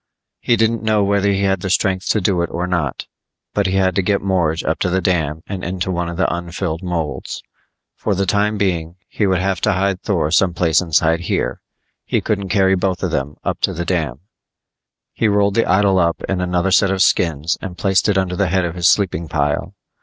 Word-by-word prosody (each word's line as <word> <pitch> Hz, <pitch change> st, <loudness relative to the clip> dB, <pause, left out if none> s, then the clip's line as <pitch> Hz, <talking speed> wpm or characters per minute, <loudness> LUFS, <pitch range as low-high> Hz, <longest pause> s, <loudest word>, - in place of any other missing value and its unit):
He 120 Hz, -, +2 dB
didn't 115 Hz, 0 st, +1 dB
know 110 Hz, -2 st, +2 dB
whether 100 Hz, 0 st, +2 dB
he 100 Hz, 0 st, 0 dB
had 95 Hz, -2 st, +1 dB
the 95 Hz, -, -3 dB
strength 95 Hz, 0 st, 0 dB
to 110 Hz, -, +2 dB
do 90 Hz, -2 st, +1 dB
it 85 Hz, -, -1 dB
or 90 Hz, +1 st, -2 dB
not, 90 Hz, -2 st, -2 dB, 0.5 s
but 100 Hz, -2 st, +1 dB
he 95 Hz, -, -1 dB
had 95 Hz, -1 st, +2 dB
to -, -, +4 dB
get 100 Hz, +2 st, +1 dB
Morge 85 Hz, -4 st, 0 dB
up 80 Hz, -, -1 dB
to 90 Hz, -, 0 dB
the 95 Hz, +1 st, +1 dB
dam 80 Hz, -4 st, -1 dB
and 95 Hz, -2 st, -6 dB
into 90 Hz, +1 st, -2 dB
one 85 Hz, -1 st, -2 dB
of 85 Hz, -, -6 dB
the 95 Hz, -, +1 dB
unfilled 85 Hz, -1 st, -4 dB
molds. 80 Hz, -7 st, -4 dB, 0.5 s
For 105 Hz, -, -1 dB
the 100 Hz, +1 st, 0 dB
time 105 Hz, +3 st, +1 dB
being 85 Hz, -4 st, -1 dB
he 105 Hz, -, -1 dB
would 95 Hz, -1 st, +2 dB
have 95 Hz, 0 st, -1 dB
to 110 Hz, -, +2 dB
hide 95 Hz, 0 st, 0 dB
Thor 85 Hz, -7 st, 0 dB
someplace 85 Hz, -3 st, +3 dB
inside 80 Hz, -1 st, +2 dB
here. 85 Hz, -, -2 dB, 0.4 s
He -, -, 0 dB
couldn't 100 Hz, -3 st, -2 dB
carry 95 Hz, 0 st, +3 dB
both 95 Hz, 0 st, -1 dB
of 90 Hz, -, -1 dB
them 70 Hz, -1 st, -2 dB
up -, -, -3 dB
to -, -, +1 dB
the 85 Hz, +1 st, -4 dB
dam. 75 Hz, -8 st, -2 dB, 0.9 s
He 115 Hz, -, +1 dB
rolled 100 Hz, -1 st, +2 dB
the 115 Hz, -, +1 dB
idol 95 Hz, 0 st, +3 dB
up 85 Hz, -1 st, 0 dB
in 95 Hz, -2 st, -1 dB
another 90 Hz, +1 st, 0 dB
set 100 Hz, +1 st, +4 dB
of 95 Hz, 0 st, +2 dB
skins 80 Hz, -1 st, +1 dB
and 90 Hz, -2 st, -7 dB
placed 95 Hz, +3 st, +2 dB
it 100 Hz, -, +2 dB
under 95 Hz, -1 st, 0 dB
the 100 Hz, +1 st, +1 dB
head 95 Hz, -1 st, +1 dB
of 85 Hz, -, -3 dB
his 85 Hz, -1 st, +1 dB
sleeping 85 Hz, -5 st, +1 dB
pile. 75 Hz, -1 st, -1 dB
95 Hz, 220 wpm, -19 LUFS, 85-100 Hz, 0.9 s, to